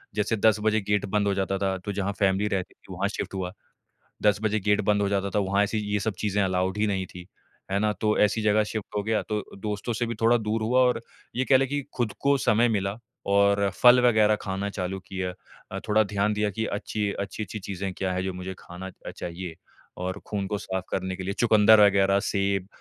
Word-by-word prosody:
जैसे 105 +1 +1
10 110 0 +4
बजे 110 0 +2
गेट 105 -1 +1
बंद 100 +1 0
हो 100 - +2
जाता 95 0 -1
था, 95 -1 -1
तो 95 +2 -5
जहाँ 100 0 -2
फ़ैमिली 100 +1 +2
रहती 95 -1 -4
थी 95 - -13
वहाँ 95 +2 -1
शिफ़्ट - - -5
हुआ। 90 -1 -4 0.7
10 105 -1 +4
बजे 110 -1 +1
गेट 105 0 +3
बंद 105 0 +2
हो 100 - +1
जाता 100 0 0
था, 105 - 0
वहाँ 100 +1 +2
ऐसी 105 +2 -1 0.2
ये 105 - +2
सब 105 +1 -1
चीज़ें 105 -1 0
अलाउड 95 +1 0
ही 105 - +2
नहीं 95 -2 -1
थी। 90 -1 -11 0.5
है 100 - +1
ना? 105 +1 +2
तो 105 +2 0
ऐसी 105 +2 +3
जग़ह 105 0 +3
शिफ़्ट 105 -1 -6
हो 105 - +1
गया 110 0 +1
तो 105 -1 0 0.2
दोस्तों 105 +3 -3
से 120 +2 -1
भी 115 - -3
थोड़ा 115 +1 +5
दूर 110 0 -2
हुआ 125 +4 +2
और 125 -2 +2 0.3
ये 130 +2 0
कह 135 - +6
लें 135 0 +1
कि 145 +1 -2
खुद 120 -4 0
को 140 0 +4
समय 120 -1 +3
मिला 100 -2 -1 0.4
और 100 0 +4
फल 125 0 +8
वग़ैरह 110 -2 +4
खाना 95 +1 -3
चालू 95 -1 -4
किया। 95 -1 -3 0.4
अ, 95 - -3
थोड़ा 110 +1 +4
ध्यान 100 +1 0
दिया 105 0 0
कि 110 +3 -3
अच्छी, 105 0 -2
अच्छी-अच्छी 105 +2 -5
चीज़ें 95 0 -4
क्या 95 0 -2
है, 90 0 -1
जो 95 -1 -2
मुझे 90 +1 -6
खाना 90 +2 -8 0.3
चाहिए। 85 -1 -6 0.4
और 95 +2 -4
खून 100 -2 -2
को 105 - -2
साफ़ 95 -2 -4
करने 95 0 -2
के 95 - -6
लिए, 100 +2 -2
चुकंदर 110 -1 +6
वग़ैरह, 100 0 +3
सेब, 100 -2 -1
100 Hz, 225 wpm, -26 LUFS, 95-110 Hz, 0.7 s, फल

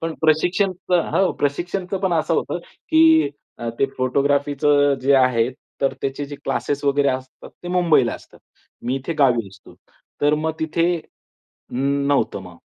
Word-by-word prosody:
...पण 165 0 -3
प्रशिक्षणच 180 +4 +1 0.2
हो 190 -1 +3
प्रशिक्षणच 175 +6 -2
पण 190 - +1
असं 165 0 +1
होतं, 175 - -1
की 320 - +3 0.3
अ, 120 - -4
ते 135 - +3
फोटोग्राफीच 140 +2 0 0.4
जे 140 +1 +4
आहे 125 -3 +3 0.3
तर 135 - +1
त्याचे 135 +1 -2
जे 145 0 -8
क्लासेस 145 0 -2
वगैरे 140 0 +2
असतात 130 0 -5
ते 175 - -6
मुंबईला 170 -9 +3
असतात. - - -14 0.4
मी 125 +2 -1
इथे 135 +5 -4
गावी 120 -6 +3
असतो. 95 +1 -17 0.5
तर 145 +1 +3
मग 155 +1 -1
तिथे 160 +1 0 0.9
नव्हतं 140 +2 0
मग. - - -12
145 Hz, 145 wpm, -21 LUFS, 135-170 Hz, 0.9 s, जे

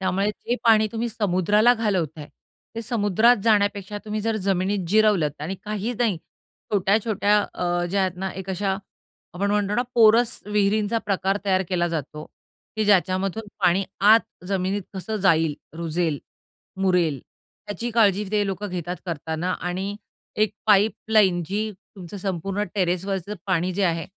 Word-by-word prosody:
त्यामुळे 190 +2 0
जे 240 +3 -3
पाणी 220 -1 +5
तुम्ही 235 +1 -2
समुद्राला 210 +3 +3
घालवत 185 -9 -1
आहे, 150 - -7 0.5
ते 230 - -4
समुद्रात 225 +1 +3
जाण्यापेक्षा 205 -2 +1
तुम्ही 215 0 -3
जर 225 +1 -1
जमिनीत 190 0 0
जिरवलत 195 -8 +2
आणि 185 +5 -3
काहीच 215 +3 -3
नाही, 230 -6 +1 0.6
छोट्या-छोट्या 205 +1 +2 0.2
अ, 175 0 -1
ज्या 200 - +1
आहेत 185 -2 -1
ना, 190 +1 -3
एक 190 0 -7
अशा 190 +1 -1 0.6
आपण 200 +3 -1
म्हणतो 205 0 0
ना 245 - +2
पोरस 230 +1 +4
विहिरींचा 210 +1 +1
प्रकार 195 0 0
तयार 190 -1 +2
केला 175 -2 0
जातो 155 -1 -5 0.5
की 215 - +1
ज्याच्यामधून 195 +1 +1
पाणी 185 +1 +3 0.3
आत 225 - +8 0.3
जमिनीत 195 +1 -1
कसं 215 +4 -4
जाईल, 165 -6 +2 0.2
रुजेल, 165 -2 -1 0.6
मुरेल, 180 -7 +2 0.5
त्याची 230 +3 -4
काळजी 210 -3 +3
ते 210 -1 +2
लोकं 195 +1 -4
घेतात 180 0 -4
करताना. 165 +2 -3
आणि 190 +3 -4 0.4
एक 215 -2 +3 0.2
पाईपलाईन 210 -2 +3
जी 210 +4 -2 0.3
तुमचं 185 +1 -9
संपूर्ण 195 +1 -2
टेरेसवरचं 190 +1 -1
पाणी 185 -1 0
जे 200 - -1
आहे, 165 -2 0
195 Hz, 145 wpm, -23 LUFS, 180-210 Hz, 0.6 s, आत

